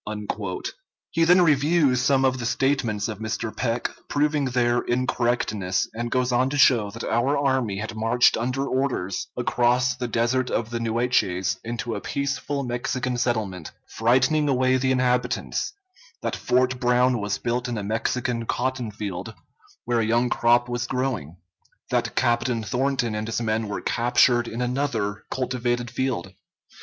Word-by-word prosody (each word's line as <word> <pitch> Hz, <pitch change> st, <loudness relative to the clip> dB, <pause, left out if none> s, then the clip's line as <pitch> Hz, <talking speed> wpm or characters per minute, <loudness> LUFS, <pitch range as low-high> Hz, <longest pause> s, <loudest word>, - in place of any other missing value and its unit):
He 165 Hz, 0 st, +2 dB
then 180 Hz, +2 st, +6 dB
reviews 145 Hz, -3 st, +3 dB
some 135 Hz, 0 st, +3 dB
of 130 Hz, 0 st, +1 dB
the 120 Hz, -, -3 dB
statements 120 Hz, -6 st, 0 dB
of 110 Hz, -3 st, -6 dB
Mr. 110 Hz, 0 st, -4 dB
Peck, 120 Hz, -1 st, -1 dB, 0.2 s
proving 150 Hz, 0 st, +1 dB
their 120 Hz, -1 st, +2 dB
incorrectness, 120 Hz, -6 st, 0 dB
and 120 Hz, +1 st, -3 dB
goes 125 Hz, 0 st, +1 dB
on 125 Hz, +2 st, +2 dB
to 145 Hz, -, -2 dB
show 120 Hz, -6 st, +5 dB
that -, -, -8 dB
our 130 Hz, +5 st, +1 dB
army 130 Hz, -7 st, 0 dB
had 110 Hz, +2 st, -5 dB
marched 115 Hz, +3 st, +3 dB
under 130 Hz, +4 st, -1 dB
orders 130 Hz, -9 st, -1 dB
across 125 Hz, +1 st, +2 dB
the 125 Hz, -1 st, -3 dB
desert 120 Hz, +3 st, 0 dB
of 115 Hz, 0 st, -2 dB
the 120 Hz, -, -2 dB
Nueces 115 Hz, -5 st, 0 dB
into 115 Hz, 0 st, -4 dB
a -, -, -4 dB
peaceful 140 Hz, 0 st, -2 dB
Mexican 125 Hz, +1 st, -2 dB
settlement, 110 Hz, -9 st, -2 dB, 0.2 s
frightening 130 Hz, +6 st, +2 dB
away 130 Hz, -1 st, +3 dB
the 130 Hz, 0 st, +1 dB
inhabitants; 125 Hz, -1 st, 0 dB, 0.5 s
that -, -, -1 dB
Fort 125 Hz, 0 st, +1 dB
Brown 125 Hz, -1 st, +2 dB
was 100 Hz, -1 st, -1 dB
built 120 Hz, +1 st, -2 dB
in 120 Hz, -2 st, -3 dB
a 105 Hz, -, -3 dB
Mexican 115 Hz, +2 st, -1 dB
cotton 130 Hz, -2 st, -1 dB
field, 105 Hz, 0 st, -6 dB, 0.5 s
where 120 Hz, -1 st, +1 dB
a -, -, +2 dB
young 120 Hz, +2 st, +1 dB
crop 120 Hz, +1 st, +3 dB
was 120 Hz, 0 st, -2 dB
growing; 120 Hz, -, -2 dB, 0.5 s
that -, -, 0 dB
Captain 120 Hz, -1 st, +1 dB
Thornton 125 Hz, 0 st, 0 dB
and 105 Hz, 0 st, -3 dB
his 115 Hz, -, -1 dB
men 110 Hz, -1 st, -1 dB
were 100 Hz, -, -4 dB
captured 120 Hz, 0 st, +3 dB
in 120 Hz, +2 st, -3 dB
another 120 Hz, -6 st, -2 dB
cultivated 120 Hz, -2 st, -2 dB
field. 115 Hz, -9 st, -2 dB
120 Hz, 150 wpm, -24 LUFS, 115-130 Hz, 0.5 s, then